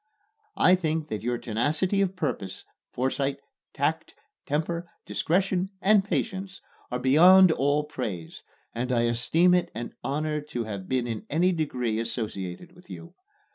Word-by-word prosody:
I 180 - +6
think 160 -3 0
that 105 -2 -3
your 120 +2 -1
tenacity 150 - 0
of 190 -1 0
purpose, 100 - -4 0.3
foresight, 135 +2 -1 0.3
tact, - - -2 0.3
temper, 170 +4 -2 0.2
discretion 185 +2 0
and 200 0 +4
patience, 195 -2 -3 0.3
are 125 - -2
beyond 175 +8 +7
all 145 0 +1
praise, 110 - -6 0.3
and 125 +2 -2
I 120 -2 +2
esteem 125 +10 +3
it 180 -1 +2
an 120 +1 -5
honor 150 +3 -1
to 125 -5 -4
have 100 -4 -6
been 130 -2 +1
in 115 -3 -5
any 175 +5 +2
degree 125 -9 -1
associated 115 - -4
with 180 +1 -19
you. 170 +1 -10
150 Hz, 140 wpm, -26 LUFS, 120-180 Hz, 0.3 s, beyond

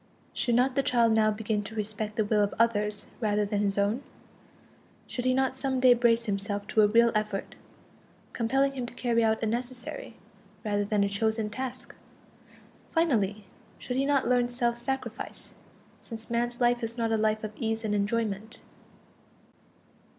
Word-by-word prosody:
Should 240 -2 +1
not 255 +2 +3
the 275 - +2
child 235 -4 +3
now 220 -1 +4
begin 210 0 -1
to 215 +2 -8
respect 215 0 -3
the 220 -3 +1
will 210 0 +2
of 205 - 0
others 210 -2 +1
rather 210 -2 +1
than 205 0 -1
his 200 -1 0
own? 205 +5 +1 1.0
Should 245 - -4
he 255 - +3
not 265 0 +1
some 265 -1 -1
day 250 -1 +7
brace 235 -1 +3
himself 205 -1 -2
to 220 - +4
a 210 - +6
real 230 +2 +5
effort, 210 -2 -2 0.8
compelling 270 +4 +1
him 255 -3 -4
to 240 - -11
carry 235 -2 +1
out 220 0 +1
a - - +3
necessary, 245 - -4 0.5
rather 205 -1 +1
than 205 0 +1
a - - +2
chosen, 220 +1 0
task? 255 +2 -6 1.0
Finally, 215 - +1 0.3
should 250 - -5
he 270 +2 +1
not 280 -3 +2
learn 245 -1 +3
self 240 -1 0
sacrifice, 245 -1 -5 0.5
since 225 -1 -9
man's 240 +1 -1
life 240 0 +3
is 230 +1 -3
not 230 -1 0
a - - +3
life 215 0 +1
of 215 0 -4
ease 225 0 -2
and 210 - 0
enjoyment? 215 +1 -1
225 Hz, 170 wpm, -28 LUFS, 210-245 Hz, 1.0 s, day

